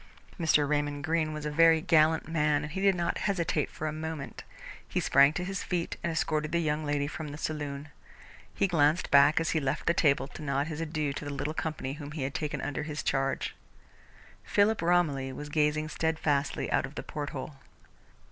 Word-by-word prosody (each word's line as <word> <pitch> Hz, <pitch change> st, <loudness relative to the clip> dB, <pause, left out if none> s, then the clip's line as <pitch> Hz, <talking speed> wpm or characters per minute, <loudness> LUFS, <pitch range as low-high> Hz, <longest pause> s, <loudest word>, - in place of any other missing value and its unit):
Mr. 150 Hz, -3 st, +3 dB
Raymond 145 Hz, 0 st, -1 dB
Greene 160 Hz, 0 st, 0 dB
was 150 Hz, -1 st, -5 dB
a 150 Hz, -, -2 dB
very 165 Hz, +1 st, +5 dB
gallant 160 Hz, -2 st, +3 dB
man, 150 Hz, -2 st, +1 dB
and 150 Hz, -, -6 dB
he 190 Hz, -, -3 dB
did 195 Hz, -1 st, +4 dB
not 170 Hz, -1 st, -1 dB
hesitate 170 Hz, -6 st, 0 dB
for 155 Hz, -, -6 dB
a 155 Hz, -, -2 dB
moment. 155 Hz, -2 st, -6 dB, 0.4 s
He -, -, -1 dB
sprang 140 Hz, +1 st, +5 dB
to 180 Hz, -, -3 dB
his 195 Hz, +1 st, -3 dB
feet 175 Hz, -2 st, -2 dB
and 170 Hz, -, -1 dB
escorted 155 Hz, -1 st, -1 dB
the 170 Hz, -, +1 dB
young 155 Hz, -1 st, 0 dB
lady 145 Hz, -1 st, 0 dB
from 155 Hz, +1 st, -5 dB
the 145 Hz, 0 st, -7 dB
saloon. 150 Hz, -2 st, -4 dB, 0.6 s
He -, -, +1 dB
glanced 160 Hz, -2 st, +2 dB
back, 145 Hz, +2 st, +6 dB
as 165 Hz, -, 0 dB
he 160 Hz, -, +1 dB
left 140 Hz, +1 st, -2 dB
the 170 Hz, -, +3 dB
table, 140 Hz, -5 st, +2 dB
to -, -, -10 dB
nod 140 Hz, -1 st, 0 dB
his 160 Hz, 0 st, -5 dB
adieux 155 Hz, -3 st, -2 dB
to 145 Hz, -, -6 dB
the 145 Hz, -, -4 dB
little 145 Hz, +2 st, -3 dB
company 155 Hz, -4 st, -3 dB
whom 145 Hz, 0 st, -8 dB
he 150 Hz, -3 st, -3 dB
had 135 Hz, +1 st, -3 dB
taken 150 Hz, -2 st, -3 dB
under 145 Hz, 0 st, -3 dB
his 150 Hz, 0 st, -4 dB
charge. 135 Hz, 0 st, -1 dB, 0.9 s
Philip 210 Hz, 0 st, +2 dB
Romilly 160 Hz, -6 st, +1 dB
was 145 Hz, +3 st, -7 dB
gazing 150 Hz, 0 st, +1 dB
steadfastly 160 Hz, -4 st, -1 dB
out -, -, +1 dB
of 140 Hz, -, -15 dB
the -, -, -5 dB
porthole. 145 Hz, -1 st, -6 dB
150 Hz, 200 wpm, -29 LUFS, 145-160 Hz, 0.9 s, back